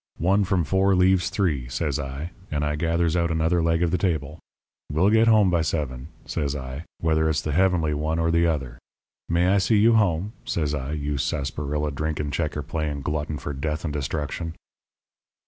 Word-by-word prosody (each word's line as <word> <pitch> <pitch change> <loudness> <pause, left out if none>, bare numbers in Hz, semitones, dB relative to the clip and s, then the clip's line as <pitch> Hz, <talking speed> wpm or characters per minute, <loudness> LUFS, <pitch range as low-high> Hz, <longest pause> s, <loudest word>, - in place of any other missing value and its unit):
One 95 +5 +3
from 95 -2 +1
four 95 +4 +2
leaves 90 0 +3
three,' 75 - -1
says 70 +2 -1
I, 70 +5 -5 0.2
and 75 -1 -1
I 75 0 0
gathers 85 +1 +1
out 85 -1 +1
another 80 +2 +1
leg 80 +1 +2
of 85 - +1
the 90 - +1
table. 80 -4 -1 0.5
'We'll 90 +8 +3
get 110 +1 +5
home 105 -4 +5
by 85 -2 +2
seven,' 75 -4 -2 0.2
says 70 -2 -2
I, 65 +3 -6 0.2
'whether 80 -1 +2
it's 75 - 0
the 75 - -2
heavenly 85 -2 +2
one 80 +2 -1
or 85 0 +1
the 85 0 +3
other. 65 -7 -2 0.5
May 85 +2 +3
I 100 +1 +4
see 95 +4 +3
you 115 +3 +5
home?' 100 -2 +2
says 75 -3 -1
I, 70 0 -3
'you 75 -2 -2
sarsaparilla 75 +1 -2
drinking, 75 0 -2
checker 75 -1 -2
playing 75 -3 -3
glutton 75 +1 -2
for 70 - -5
death 75 +3 -3
and 75 - -2
destruction.' 75 +3 -3
80 Hz, 185 wpm, -24 LUFS, 75-90 Hz, 0.5 s, get